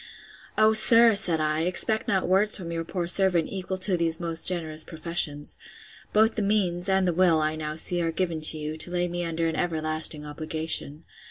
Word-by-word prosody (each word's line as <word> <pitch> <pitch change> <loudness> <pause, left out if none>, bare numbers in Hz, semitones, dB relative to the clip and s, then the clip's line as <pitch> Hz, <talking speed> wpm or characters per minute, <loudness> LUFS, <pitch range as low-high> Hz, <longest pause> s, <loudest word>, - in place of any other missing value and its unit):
O, 215 0 +3
sir, 230 +1 +6
said 180 -5 +4
I, 155 0 -1
expect 185 +5 -1
not 190 -2 0
words 195 +3 +3
from 170 -4 -8
your 165 0 -4
poor 175 +1 -5
servant, 180 -2 +2
equal 190 -1 -5
to 185 0 +2
these 165 -1 -2
most 165 -2 -3
generous 160 -3 -1
professions. 155 -3 -4 0.5
Both 220 +2 +2
the 220 - -4
means, 195 -3 -1
and 190 -1 +1
the 175 - 0
will, 170 -2 +2
I 155 0 -2
now 155 -1 -6
see, 175 +2 +3
are 165 -1 -2
given 165 -2 -3
to 160 - -1
you, 155 +1 -6
to 160 - +1
lay 175 0 -2
me 175 0 -5
under 165 0 -3
an 160 - -3
everlasting 155 -2 -2
obligation. 155 0 -3
170 Hz, 195 wpm, -24 LUFS, 160-185 Hz, 0.5 s, sir